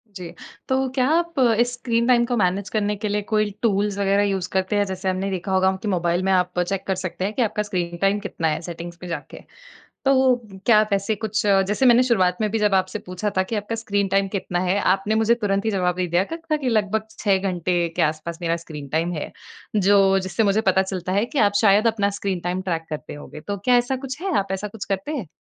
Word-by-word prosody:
जी। 180 -3 -7 0.4
तो 265 0 +1
क्या 260 -1 +1
आप 335 -1 +1
अ, 235 -3 +4
स्क्रीन 235 -1 -1
टाइम 240 -1 +4
को 245 0 -1
मैनेज 195 +1 0
करने 210 -1 0
के 210 +1 -4
लिए 205 0 0
कोई 215 -1 +2
टूल्स 205 -2 +1
वगैरह 200 0 +2
यूज़ 190 -3 -1
करते 190 +2 0
हैं? 205 0 +2
जैसे 190 0 -3
हमने 185 +1 -1
देखा 190 +1 -3
होगा 190 0 +3
कि 215 - -4
मोबाइल 175 -1 0
में 195 - +1
आप 180 -1 +1
चेक 190 +2 -1
कर 190 - +1
सकते 185 0 -4
हैं 210 - -2
कि 255 - -1
आपका 210 -2 0
स्क्रीन 180 -4 -3
टाइम 195 +1 +2
कितना 185 -5 -3
है 155 +1 -1
सेटिंग्स 170 0 -8
में 180 - -6
जाके। 160 -3 -6 0.7
तो 275 0 +4
वो 260 -1 +4 0.3
क्या 225 -3 +6
आप 215 - 0
ऐसे 200 +2 +1
कुछ 215 +1 -2
अ, 195 -1 +5
जैसे 210 +7 +1
मैंने 240 0 +6
शुरुआत 185 -8 +2
में 215 - +1
भी 225 - 0
जब 210 -2 +2
आपसे 185 0 0
पूछा 185 +3 -4
था 190 - +4
कि 200 +4 -4
आपका 210 +2 -3
स्क्रीन 205 -3 -1
टाइम 195 +1 +1
कितना 185 -3 -3
है? 185 +2 +1
आपने 195 +3 +1
मुझे 225 +1 +3
तुरंत 200 -3 -1
ही 220 - +1
जवाब 180 -3 0
दे 185 - 0
दिया 175 +2 +1
था 330 -2 -2
कि 280 -4 -2
लगभग 215 -1 0
6 200 -3 +2
घंटे 180 -2 0
के 175 - +2
आस-पास 155 +2 -2
मेरा 165 0 +1
स्क्रीन 150 -3 -8
टाइम 165 +5 0
है। 155 - -4 0.5
जो 195 -1 +4
जिससे 190 +3 -1
मुझे 205 +1 +3
पता 190 - +3
चलता 185 -1 -4
है 200 +3 +2
कि 290 - -4
आप - - -9
शायद 215 +1 +4
अपना 205 -3 +2
स्क्रीन 190 -3 -2
टाइम 180 +2 -2
ट्रैक 165 -3 -2
करते 155 -1 -6
होंगे। 145 +1 -10
तो 200 +6 -4
क्या 250 -1 +5
ऐसा 245 +2 +1
कुछ 265 +5 -6
है? 385 -4 0
आप 195 - 0
ऐसा 195 +2 -3
कुछ 205 0 -7
करते 195 +9 -3
हैं? 230 -10 -4
195 Hz, 245 wpm, -22 LUFS, 185-220 Hz, 0.7 s, क्या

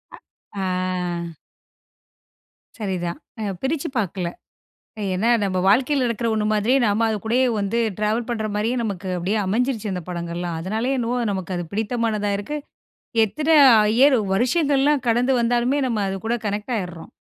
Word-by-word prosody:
அ - - -15 0.5
ஆ. 180 -3 -2 1.4
சரி 200 -5 -2
தான். 170 - -4 0.2
அ - - -4 0.2
பிரிச்சு 300 +4 -1
பாக்கல. 190 -3 -1 0.9
ஏன்னா, 220 +6 +1
நம்ம 185 -2 0
வாழ்க்கைல 255 +5 +3
நடக்கற 235 0 -2
ஒண்ணு 215 -1 0
மாதிரி, 215 +5 +2
நாம 215 +1 +2
அது 220 - 0
கூடயே 250 +4 +2
வந்து 200 +4 -1 0.2
டிராவல் 220 +3 0
பண்ற 220 -2 -2
மாரியே, 225 +4 0
நமக்கு 200 -4 -4
அப்படியே 190 +5 -1
அமைஞ்சிருச்சு 220 0 0
அந்த 180 - -4
படங்கள்லாம். 170 -1 -4
அதனாலயே 220 +9 -1
என்னவோ, 245 +1 -1
நமக்கு 190 -1 -4
அது 175 - -3
பிடித்தமானதா 220 -1 -1
இருக்கு. 295 +9 -4 0.7
எத்தன 300 +9 -4 0.4
இயர் 255 +5 +5 0.2
வருஷங்கள்லாம் 280 - +2
கடந்து 245 +3 +2
வந்தாலுமே, 245 +4 +1
நம்ம 225 -4 -1
அது 190 - -3
கூட 235 +1 0
கனெக்டு 210 +4 -2
ஆயிர்றோம். 175 -4 -6
220 Hz, 145 wpm, -22 LUFS, 190-245 Hz, 1.4 s, இயர்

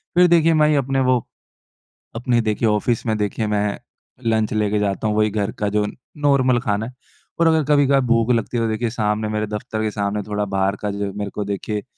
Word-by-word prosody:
फिर 180 0 +6
देखिए, 165 -1 +4
मैं 155 -1 +4
ये 150 - +3
अपने 135 -1 0
वो, 125 -2 +2 0.9
अपने 120 +1 +1
देखिए, 110 +1 0
ऑफिस 110 +3 0
में 110 -1 0
देखिए, 105 +1 -2
मैं 105 -1 -1 0.5
लंच 110 -2 +1
लेके 105 -1 +1
जाता 100 +1 -1
हूँ। 105 - 0
वही 110 0 +3
घर 105 -1 -2
का 105 - 0
जो 105 0 +1 0.3
नॉर्मल 135 -4 +3
खाना 105 -1 -1
है। 125 - -9 0.5
और 170 - +4
अगर 160 -1 +3
कभी-कभार 140 -1 +4
भूख 115 -1 +2
लगती 115 +1 0
है 115 - +1
तो 115 - +1
देखिए, 110 +2 -1
सामने 110 -1 -1
मेरे 105 0 -2
दफ़्तर 105 +1 -4
के 110 - -1
सामने, 100 0 -2
थोड़ा 105 0 -1
बाहर 95 +1 +1
का 105 - -2
जो, 100 0 -3
मेरे 100 0 -4
को 105 - -3
देखिए, 100 +1 -3
110 Hz, 215 wpm, -21 LUFS, 105-125 Hz, 0.9 s, फिर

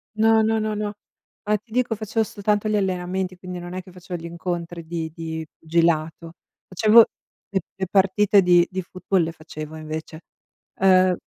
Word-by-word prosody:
No, 220 0 +4
no, 220 0 +2
no, 215 0 -1
no. 210 0 -3 0.5
Ma 210 0 +1
ti 215 +2 -27
dico 240 -2 +1
facevo 220 +1 -1
soltanto 210 +1 -1
gli 215 - +1
allenamenti, 185 -1 -1
quindi 180 -1 -7
non 175 +1 -8
è 185 - -4
che 185 - -15
facevo 180 -1 -7
gli - - -8
incontri 170 0 -5
di 160 -1 -4
di 160 -1 -5
pugilato. 165 0 0 0.3
Facevo 215 +4 +6 0.4
le 195 - 0 0.2
le 190 -1 -3
partite 195 +1 +4
di 175 -1 +5
di 185 0 -3
football 185 0 -1
le 165 - -2
facevo 155 -1 -9
invece; 155 +1 -6 0.6
uhm, 185 -1 +5
185 Hz, 170 wpm, -23 LUFS, 170-210 Hz, 0.6 s, Facevo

